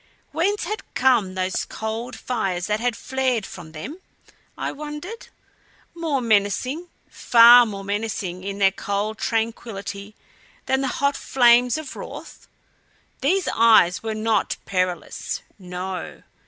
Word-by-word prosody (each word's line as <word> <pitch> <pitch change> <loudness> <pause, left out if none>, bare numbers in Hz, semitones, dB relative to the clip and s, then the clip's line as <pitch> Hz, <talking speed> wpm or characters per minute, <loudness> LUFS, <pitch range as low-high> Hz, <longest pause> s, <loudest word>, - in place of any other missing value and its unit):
Whence 375 +7 0
had 430 +1 -3
come 235 -8 +3
those 185 0 -1
cold 225 +3 -5
fires 190 -8 -2
that 210 +1 0
had 240 0 0
flared 260 -5 -1
from 170 -5 -10
them, 260 - -8 0.6
I - - -2
wondered 300 - -7 0.7
more 320 -6 -1
menacing, 230 - +1 0.2
far 240 0 +7
more 200 -2 -6
menacing, 200 -3 -3
in 200 0 -4
their 195 -1 +4
cold 205 +3 -3
tranquillity 215 -3 -3 0.5
than 265 0 +1
the 270 - 0
hot 280 +2 0
flames 245 +1 +4
of 315 -3 -7
wrath? - - -9 0.7
These 365 +8 +1
eyes 220 -6 +5
were 220 -1 -3
not 220 +1 0
perilous 185 -2 -2 0.2
no. 180 0 -6
225 Hz, 125 wpm, -23 LUFS, 195-265 Hz, 0.7 s, far